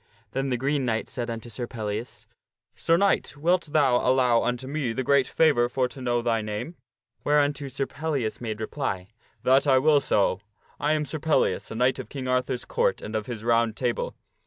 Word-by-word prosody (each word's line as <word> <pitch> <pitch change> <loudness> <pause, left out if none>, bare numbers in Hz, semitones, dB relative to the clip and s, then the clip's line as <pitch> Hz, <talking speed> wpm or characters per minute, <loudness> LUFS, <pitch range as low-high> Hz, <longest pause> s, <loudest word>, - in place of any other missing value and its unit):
Then 135 +1 -1
the 125 - 0
Green 135 +2 0
Knight 115 -3 -1
said 120 -2 -4
unto 115 0 -5
Sir 120 +2 -5
Pellias, 110 0 -5 0.3
" - - -52
Sir 165 - +2
Knight, 200 -5 +1
wilt 170 +2 +1
thou 140 -5 +4
allow 125 -2 +3
unto 125 +1 -2
me 135 -4 -2
the 130 - -2
great 140 0 +3
favor 130 -7 +3
for 130 0 0
to 130 - -10
know 120 -1 0
thy 115 -2 +1
name? 105 +11 -5 0.2
" - - -48
Whereunto 145 -1 +2
Sir 135 +1 -2
Pellias 140 -7 -3
made 110 -3 -4
reply, 110 -6 -3 0.2
" 110 - -36
That 135 +3 +4
will 140 +3 +5
I - - +5
so. 100 -7 +1 0.4
I 150 +1 +2
am 150 -1 0
Sir 155 - -5
Pellias, 160 +1 +1
a - - -6
knight 125 +3 +2
of - - -7
King 135 -2 -5
Arthur's 125 -1 0
Court - - 0
and 110 - -5
of 110 -1 -2
his 115 -3 -6
Round 115 -1 +2
Table." 120 -2 -2
130 Hz, 205 wpm, -26 LUFS, 115-145 Hz, 0.4 s, will